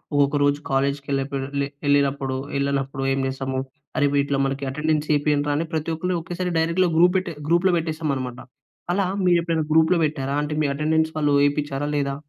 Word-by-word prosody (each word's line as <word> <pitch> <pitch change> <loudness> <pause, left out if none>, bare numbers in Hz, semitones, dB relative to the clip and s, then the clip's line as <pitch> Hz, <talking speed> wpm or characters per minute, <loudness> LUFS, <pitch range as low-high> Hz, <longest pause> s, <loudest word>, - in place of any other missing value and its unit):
ఒక్కొక్క 145 0 +3
రోజు 145 0 +2
కాలేజ్‌కి 140 +1 0
ఎళ్ళకపోయే 135 0 -2
లె 140 - 0 0.2
ఎళ్ళినప్పుడు, 140 -2 +1 0.2
ఎళ్ళనప్పుడు 135 -1 -1
ఏం 135 - -1
జేస్తాము? 130 0 -3 0.4
అరె! 145 - +3
వీటిలో 140 -1 +1
మనకి 135 +1 -2
అటెండెన్స్ 150 +1 0
ఏపియండ్రా! 145 0 +1
అని 165 +2 -2
ప్రతి 160 +1 -1
ఒక్కళ్ళు 180 +2 -1
ఒకేసారి 175 +2 -3
డైరెక్ట్‌‌గా 170 +3 +2
గ్రూప్ 180 +2 +5
పెట్టె 180 -2 -3 0.2
గ్రూప్‌లో 175 +2 +3
పెట్టేస్తామన్నమాట. 150 -6 -3 0.5
అలా 195 -1 +1 0.2
మీరు 175 -1 +4
ఎప్పుడైనా 165 -2 0
గ్రూప్‌లో 160 +2 +4
పెట్టారా? 140 -2 -2
అంటే 150 - -3
మీ - - +2
అటెండెన్స్ 160 +2 +1
వాళ్ళూ 145 -2 +2
ఏయిపించారా 145 0 -2
లేదా? 140 -1 -1
145 Hz, 165 wpm, -23 LUFS, 140-160 Hz, 0.5 s, గ్రూప్